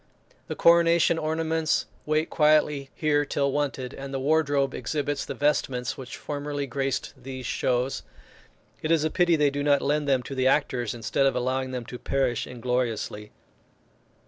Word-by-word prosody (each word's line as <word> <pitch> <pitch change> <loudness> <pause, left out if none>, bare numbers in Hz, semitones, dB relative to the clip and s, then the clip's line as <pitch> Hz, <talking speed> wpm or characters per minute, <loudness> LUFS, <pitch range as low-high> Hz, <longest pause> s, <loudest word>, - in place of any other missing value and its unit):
The - - -4
coronation 170 -1 +4
ornaments 160 0 0 0.2
wait 155 +1 +1
quietly 150 -2 +3
here 150 -2 +2
till 140 -1 0
wanted, 135 -3 -2
and 135 0 -7
the 135 - -2
wardrobe 145 -1 +2
exhibits 145 -2 -2
the - - -5
vestments 135 -4 0
which 130 -1 -8
formerly 145 -1 -4
graced 135 0 -2
these 130 0 -8
shows. 125 +3 0 0.8
It 155 - -3
is 165 -2 +3
a 155 - 0
pity 175 -2 +3
they 150 -2 +3
do 145 +1 -3
not 145 -1 +3
lend 145 +1 0
them 130 -2 +2
to 135 - -7
the 130 -1 +1
actors, 125 -5 +1
instead 120 +4 +1
of 135 - 0
allowing 130 +1 -1
them 125 -2 -5
to 125 +1 -8
perish 125 -3 0
ingloriously. 120 -4 -3
140 Hz, 160 wpm, -26 LUFS, 130-150 Hz, 0.8 s, coronation